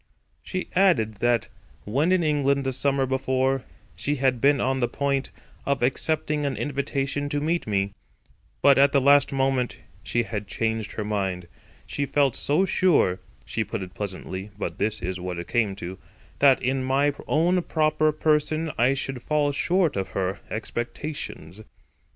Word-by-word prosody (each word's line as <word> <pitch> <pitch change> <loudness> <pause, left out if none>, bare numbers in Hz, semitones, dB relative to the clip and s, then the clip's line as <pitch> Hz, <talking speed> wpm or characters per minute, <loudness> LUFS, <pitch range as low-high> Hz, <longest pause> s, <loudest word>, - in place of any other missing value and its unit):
She 185 -1 -4
added 130 - +3
that, 120 +1 +1 0.4
when 140 - +1
in 185 -2 +3
England 140 -2 +2
the 135 - -1
summer 135 +1 +1
before, 130 0 0 0.3
she 145 - -1
had 130 -3 +1
been 140 0 +4
on 130 +1 0
the 120 - +2
point 140 0 -1 0.3
of 140 -3 0
accepting 150 +3 0
an 140 -2 -1
invitation 140 0 -2
to 145 - -1
meet 165 +1 -1
me; 100 -1 0 0.7
but 140 -1 +6
at 140 0 +5
the 140 - +5
last 140 +1 +5
moment 135 -2 0 0.2
she 120 - 0
had 105 -3 -5
changed 110 0 -2
her 105 - -3
mind; 95 -4 -2 0.4
she 140 -1 -2
felt 140 -4 +2
so 155 +7 +2
sure—she 95 - +1
put - - -4
it 90 - -10
pleasantly, 95 0 -5
but - - -4
this 105 -1 -1
is 90 +1 -3
what 90 -1 -4
it 85 0 -6
came 110 -5 +1
to—that 95 +8 0
in 130 +1 0
my 140 +2 +2
own 175 +4 +2
proper 155 -1 +2
person 155 +1 +1
I 125 +3 +4
should 135 -2 -3
fall 150 0 +1
short 175 +3 +1
of 95 -1 -2
her 95 +1 -1
expectations. 115 - -5
135 Hz, 155 wpm, -25 LUFS, 110-145 Hz, 0.7 s, but